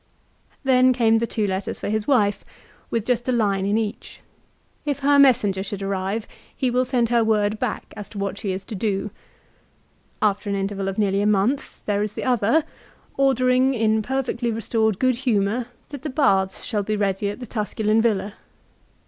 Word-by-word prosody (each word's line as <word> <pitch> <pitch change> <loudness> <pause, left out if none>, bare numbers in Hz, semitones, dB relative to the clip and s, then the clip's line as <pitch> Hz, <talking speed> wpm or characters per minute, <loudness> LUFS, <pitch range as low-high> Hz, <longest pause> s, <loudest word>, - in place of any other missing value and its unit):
Then 255 -1 +5
came 225 -2 +3
the 235 - -1
two 215 -2 -1
letters 190 0 -3
for - - -4
his 215 +1 -1
wife, 210 -7 +2 0.5
with 230 -2 -1
just 245 0 0
a - - +4
line 200 -5 +1
in 205 +2 +2
each. 220 +1 -4 0.6
If 285 -1 -2
her 285 +1 +4
messenger 215 -8 +4
should 200 0 -5
arrive, 195 +3 -2 0.3
he 255 -2 0
will 250 +1 +2
send 245 -3 +1
her 235 -1 +3
word 215 -1 +1
back - - -3
as 210 -2 -8
to 210 - -11
what 200 0 -3
she 200 - -2
is 190 +1 -5
to - - -8
do. 205 0 -2 1.1
After 205 0 0
an 200 - 0
interval 195 0 -2
of 195 - -3
nearly 200 -2 +1
a 205 - +2
month 210 +7 0
there 205 -1 0
is 210 0 -3
the - - -4
other, 250 +5 +2 0.5
ordering, 260 -1 +3
in 220 -1 +2
perfectly 250 0 -2
restored 220 -2 0
good 255 0 +2
humour, 235 -1 0 0.2
that 285 -3 -7
the 300 - -4
baths 195 -9 +1
shall 210 -3 -1
be 215 +2 -2
ready 200 -1 0
at 205 - -6
the 250 - -6
Tusculau 215 0 0
villa. 210 -3 0
220 Hz, 185 wpm, -23 LUFS, 200-250 Hz, 1.1 s, Then